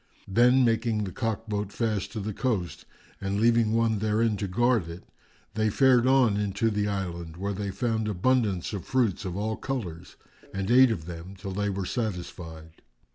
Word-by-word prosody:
Then, 125 +5 +4
making 115 -2 +1
the 95 - -4
cock 115 +3 -3
boat 105 -1 -2
fast 110 -2 -2
to 110 - -3
the 105 +1 -4
coast 100 -8 -2 0.4
and 100 +1 -1
leaving 115 -1 +3
one 115 -2 +2
therein 110 +1 +1
to 100 - -3
guard 115 -2 +1
it, 85 +2 -9 0.5
they 110 0 +1
fared 130 +1 +4
on 130 -6 +4
into 105 +2 0
the 105 0 0
island, 85 -5 -4
where 100 +2 -2
they 100 0 -3
found 110 +1 -1
abundance 105 -2 +1
of 100 -4 -4
fruits 120 -7 0
of 90 0 -4
all 110 +2 -2
colours 90 -11 -5 0.4
and 95 +3 -1
ate 130 +1 +7
of 95 -9 -3
them 85 +3 -8
till 95 +1 -7
they 105 +2 -1
were 95 -1 -3
satisfied. 85 -7 -5
105 Hz, 180 wpm, -27 LUFS, 95-115 Hz, 0.5 s, ate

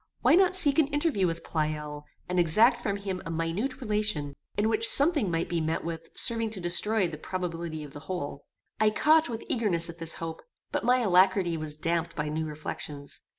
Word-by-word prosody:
Why - - +4
not 370 +2 +4
seek 310 -5 +4
an 305 - +3
interview 290 - 0
with 165 0 -4
Pleyel, 150 -2 -4 0.2
and 180 0 -1
exact 215 +9 +3
from 200 -3 -2
him 195 -2 -5
a - - -7
minute 165 +12 -3
relation, 210 - -1 0.2
in 210 +1 +1
which 225 0 +4
something 285 - +6
may 165 0 0
be 170 -1 -3
met 160 +1 -2
with 165 -1 -6
serving 230 -2 +2
to 215 -3 -7
destroy 185 +3 +1
the 155 -3 -8
probability 170 -3 -5
of 145 - -11
the 145 - -8
whole? 145 -6 -5 0.4
I 215 0 +4
caught, 310 +8 +3
with 230 -1 -5
eagerness, 175 -8 +1
at 165 - -18
this 165 0 +1
hope; 165 -1 -7 0.3
but - - -1
my 250 +2 +3
alacrity 185 -3 +3
was 155 -2 -5
damped 165 +1 -2
by 150 -1 -3
new 155 +1 -3
reflections. 150 -1 -7
180 Hz, 195 wpm, -27 LUFS, 160-225 Hz, 0.4 s, something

